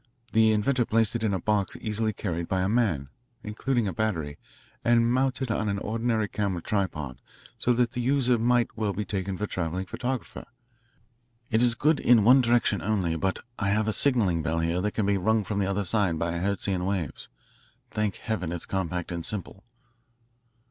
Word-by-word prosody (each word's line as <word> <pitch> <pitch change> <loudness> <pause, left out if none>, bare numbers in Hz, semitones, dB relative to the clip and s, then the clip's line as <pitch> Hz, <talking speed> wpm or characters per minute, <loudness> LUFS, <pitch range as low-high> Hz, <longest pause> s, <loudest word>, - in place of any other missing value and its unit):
The 110 0 +5
inventor 120 +4 +2
placed 115 -1 +1
it 120 - -1
in 110 -2 +1
a 95 - 0
box 100 +1 0
easily 110 0 -1
carried 85 -5 -3
by 95 -1 0
a - - +1
man, 95 - +1 0.3
including 115 +2 -1
a 95 - -2
battery, 80 -9 -2 0.4
and 115 0 +3
mounted 130 -1 0
on 110 -1 0
an 100 - -1
ordinary 110 +1 -1
camera 100 -4 -2
tripod 85 - -2 0.4
so 125 - +2
that 120 0 +1
the 125 -2 -3
user 125 -2 +2
might 120 0 +2
well 110 -2 -1
be 105 +3 -3
taken 95 -1 -3
for 105 - -4
a - - 0
travelling 90 +1 -3
photographer. 125 +6 -4 1.1
It 110 +1 +3
is 120 -1 +4
good 150 +4 +2
in 120 -3 +5
one 130 +5 +7
direction 120 -5 +2
only, 95 -5 0
but 95 +3 -1 0.2
I 100 - 0
have 105 +2 +1
a 110 - +1
signalling 100 -8 +2
bell 80 +1 -1
here 85 +2 0
that 105 +2 -1
can 110 - +1
be 100 0 +2
rung 110 +3 +2
from 100 +1 -2
the 95 - +1
other 100 +1 -1
end 95 -6 +2
by 85 +2 -1
Hertzian 95 -1 -1
waves. 95 -6 -3 0.6
Thank 105 -3 -1
Heaven, 95 -7 -3
it's 85 -1 -4
compact 90 -2 -3
and 85 -1 -3
simple. 95 0 -5
105 Hz, 190 wpm, -27 LUFS, 95-115 Hz, 1.1 s, one